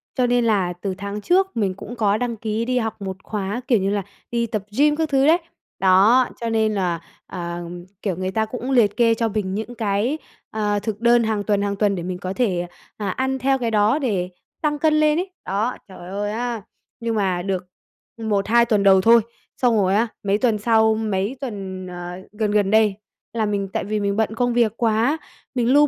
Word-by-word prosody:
cho 255 - +2
nên 245 -1 +2
là 190 -5 +2
từ 195 -2 -2
tháng 200 +1 -5
trước 375 - +2
mình 195 -4 +1
cũng 210 +5 -9
có 210 -3 +2
đăng 240 0 -2
ký 220 +1 -2
đi 255 0 0
học 225 -2 -4
một 190 -1 -4
khóa, 210 +2 -3
kiểu 235 -5 +4
như 195 +1 0
là, 205 -1 0 0.3
đi 235 -1 +1
tập 210 -3 -3
gym 295 +1 +4
các 320 0 -1
thứ 270 -1 +3
đấy. 320 +3 +6 0.4
Đó, 200 +7 +5
cho 230 - -1
nên 220 -1 +1
là, 180 -4 0 0.3
ờ, 170 -1 -5 0.4
kiểu, 195 -4 -1
người 185 +1 -3
ta 220 +3 +1
cũng 250 +4 -5
liệt 225 -6 +3
kê 230 -2 +4
cho 230 0 0
mình 195 -3 -2
những 220 +3 -5
cái, 220 +6 0 0.3
ờ, 210 -1 0
thực 210 0 -4
đơn 235 0 +5
hàng 220 -2 0
tuần, 205 0 +1
hàng 200 0 -1
tuần 200 -1 +1
để 175 - -4
mình 180 0 -4
có 185 0 -4
thể, 185 -6 0 0.3
à, 205 -2 -2
ăn 265 +6 -1
theo 270 +1 +2
cái 235 -2 -1
đó 215 +6 +3
để 200 -10 -1 0.3
tăng 295 -1 0
cân 310 +1 +3
lên 305 +1 +3
ấy. 375 - -3 0.2
Đó, 210 +6 -1
trời 180 -2 -11
ơi 205 +2 -2
á! 235 0 -3 0.4
Nhưng 230 -1 -2
mà 190 -4 0
được 185 -1 -3 0.5
1,2 220 +1 +2
tuần 215 -4 +2
đầu 190 -1 +6
thôi, 230 +3 +6 0.4
xong 245 -3 +3
rồi 195 -1 +2
á, 225 +3 +3 0.2
mấy 200 0 +2
tuần 225 -1 +2
sau, 220 0 +3
mấy 215 +2 -1
tuần, 190 -7 -5
ờ, 175 -1 -6 0.2
gần 210 0 -1
gần 205 -2 +2
đây 215 -2 +4 0.4
là 225 -2 0
mình 200 -1 -1
tại - - -1
vì 210 +2 -2
mình 200 -1 0
bận 220 0 0
công 245 +1 +1
việc 235 -3 +3
quá, 230 +6 +2 0.4
mình 245 0 +2
lu 295 +1 +6
215 Hz, 220 wpm, -22 LUFS, 200-240 Hz, 0.5 s, đấy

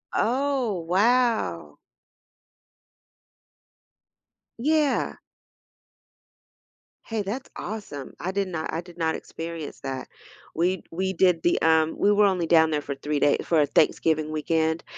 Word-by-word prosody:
Oh, 255 -5 0
wow! 200 - +1 2.8
Yeah. 300 +3 +1 1.9
Hey, 225 -2 -2
that's 215 +7 -5
awesome. 190 -11 -6
I 180 +4 -2
did 195 0 -1
not 160 -3 -4
I 160 - -1
did 175 0 -11
not 160 -2 0
experience 165 -2 -7
that. 135 -2 -5 0.5
We 180 +2 0
we 190 +3 -2
did 180 -3 +2
the, 175 - +2
um 160 0 +3
we 205 - +3
were 205 0 +5
only 185 -4 +1
down 160 -1 +5
there 150 -1 0
for 140 -1 -5
3 145 +2 -2
day 145 - +3
for, 165 - +2
uh, - - +4
Thanksgiving 155 +2 +1
weekend, 160 +1 0
170 Hz, 125 wpm, -25 LUFS, 155-205 Hz, 2.8 s, were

